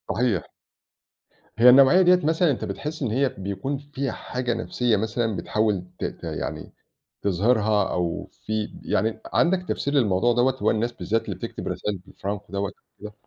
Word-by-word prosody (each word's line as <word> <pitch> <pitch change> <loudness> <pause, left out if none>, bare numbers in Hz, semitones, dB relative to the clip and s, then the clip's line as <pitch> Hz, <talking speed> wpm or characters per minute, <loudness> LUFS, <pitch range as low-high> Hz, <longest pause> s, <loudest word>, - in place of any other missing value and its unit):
صحيح. 115 - 0 1.1
هي 120 +2 +9
النوعية 135 +8 +7
دِيَّة 180 0 +6
مثلًا 160 +1 +3
أنت 130 - -3
بتحس 155 +1 -5
إن 125 -6 -1
هي 135 +3 +2
بيكون 100 +8 -4
فيها 140 -2 -4
حاجة 125 0 -3
نفسيّة 115 0 0
مثلًا 110 +1 -1
بتحاول 105 -1 0 0.2
ت - - -2
ت - - -6
يعني - - -5 0.5
تظهِرها 105 +1 +2
أو 85 -1 -2 0.2
في 110 -1 -2
يعني، 110 +3 0
عندك 180 +1 +2
تفسير 140 - -1
للموضوع 120 -3 +3
دَوَّة، 125 +2 +2
هو - - +3
الناس 115 +2 0
بالذات 115 -1 -2
اللي - - -4
تكتب - - -6
رسايل 105 -1 -2
بالفرانكو 100 +2 -7
دَوَّة 100 0 -1 0.3
وكده؟ 105 +1 -8
115 Hz, 160 wpm, -24 LUFS, 105-135 Hz, 1.1 s, هي